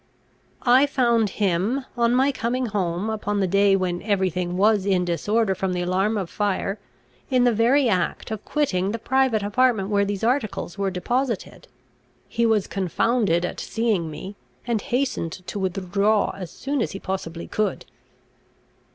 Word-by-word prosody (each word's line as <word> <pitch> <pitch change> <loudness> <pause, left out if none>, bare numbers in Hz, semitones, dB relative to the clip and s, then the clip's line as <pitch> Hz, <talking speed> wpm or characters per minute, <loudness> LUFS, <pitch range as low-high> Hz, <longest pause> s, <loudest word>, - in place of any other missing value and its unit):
"I 260 +3 +5
found 235 -6 +2
him, 205 +7 0
on 235 0 +2
my 265 +2 +3
coming 250 0 -1
home, 195 -3 -1
upon 210 -2 -2
the 195 - +2
day 200 +1 +4
when 180 -2 -1
every 195 -3 +1
thing 180 0 -3
was 205 0 +3
in 185 -2 +2
disorder 205 +4 +1
from 190 0 -2
the 180 0 -1
alarm 190 +5 +1
of 190 -4 -2
fire, 200 +1 -2 0.5
in 255 -2 +3
the 245 -1 +4
very 245 +5 +3
act 190 +1 -1
of 215 -2 -4
quitting 200 -10 0
the - - -1
private 250 -2 +1
apartment 210 -2 +2
where 200 -1 +2
these 200 +1 -3
articles 230 -7 -1
were 200 -1 -1
deposited. 230 +5 -2 0.6
He 235 0 +1
was 215 -3 +2
confounded 195 -1 +1
at - - -5
seeing 215 -8 -1
me, 190 +6 -8 0.3
and 235 -3 0
hastened 245 - -1
to 205 - -5
withdraw 195 +3 +1
as 185 -3 -7
soon 280 -1 -3
as - - -2
he 195 - -6
possibly 170 -4 -5
could." 215 -1 -2
205 Hz, 160 wpm, -23 LUFS, 185-235 Hz, 0.6 s, I